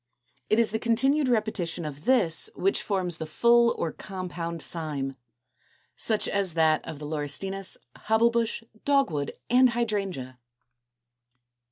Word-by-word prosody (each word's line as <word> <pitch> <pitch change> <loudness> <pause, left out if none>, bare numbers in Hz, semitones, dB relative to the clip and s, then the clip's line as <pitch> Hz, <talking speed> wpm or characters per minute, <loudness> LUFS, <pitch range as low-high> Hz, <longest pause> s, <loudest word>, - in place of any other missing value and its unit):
It 215 - +3
is 230 -2 +3
the 220 - -1
continued 265 +5 +2
repetition 210 -8 -1
of 150 0 -7
this 235 - +3
which 390 0 +1
forms 185 -4 -1
the 160 - -4
full 235 +8 +4
or 160 - -1
compound 175 -3 -6
cyme, 145 -5 -3 0.8
such 220 -2 +1
as 195 -4 -1
that 160 -1 +3
of 160 - -6
the 150 - -8
Laurestinus, 160 +6 -3 0.2
Hobble 220 +2 +3
bush, 230 0 -1 0.2
Dogwood, 270 - +1 0.2
and 255 +1 +6
Hydrangea 195 - -2
(Fig. 120 0 -54
180 Hz, 135 wpm, -27 LUFS, 150-230 Hz, 0.8 s, and